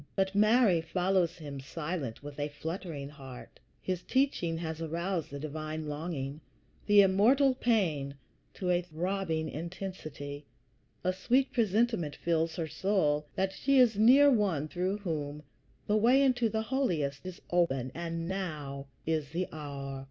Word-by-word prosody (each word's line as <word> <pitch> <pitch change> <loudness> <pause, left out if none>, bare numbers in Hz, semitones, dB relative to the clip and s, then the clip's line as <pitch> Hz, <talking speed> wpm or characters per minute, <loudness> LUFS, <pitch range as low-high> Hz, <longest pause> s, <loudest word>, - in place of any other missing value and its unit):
But 190 0 +1
Mary 215 -3 +4
follows 180 +1 +1
him, 145 -4 -7
silent, 150 -2 -5
with 145 0 -8
a 145 - 0
fluttering 160 -1 -5
heart. 135 -4 -11 0.2
His 185 -2 -2
teaching 255 -12 0
has 160 -1 -4
aroused 170 +2 -2
the 140 - -6
divine 155 +1 -5
longing, 150 -1 -4 0.5
the 205 -1 +8
immortal 240 +9 +4
pain, 175 - 0 0.4
to 180 -2 -1
a 175 0 +3
throbbing 170 -1 -2
intensity; 155 -4 -6 0.6
a 185 - +1
sweet 250 +8 +1
presentiment 220 - +1
fills 165 -1 0
her 165 - -2
soul, 150 -5 +1
that 190 0 0
she 275 +6 +2
is 245 -4 +6
near 270 +6 +7
One 190 - +1
through 185 +5 -1
whom 150 -6 -4 0.4
the 210 - +2
way 250 +6 +5
into 245 -4 +3
the 220 0 -1
Holiest 175 - -1
is 185 -1 -7
open, 135 -8 +1
and 165 0 -4
now 150 -8 -4 0.2
is 155 -3 -1
the 175 +4 -2
hour. 140 -3 -6
170 Hz, 145 wpm, -31 LUFS, 150-200 Hz, 0.6 s, the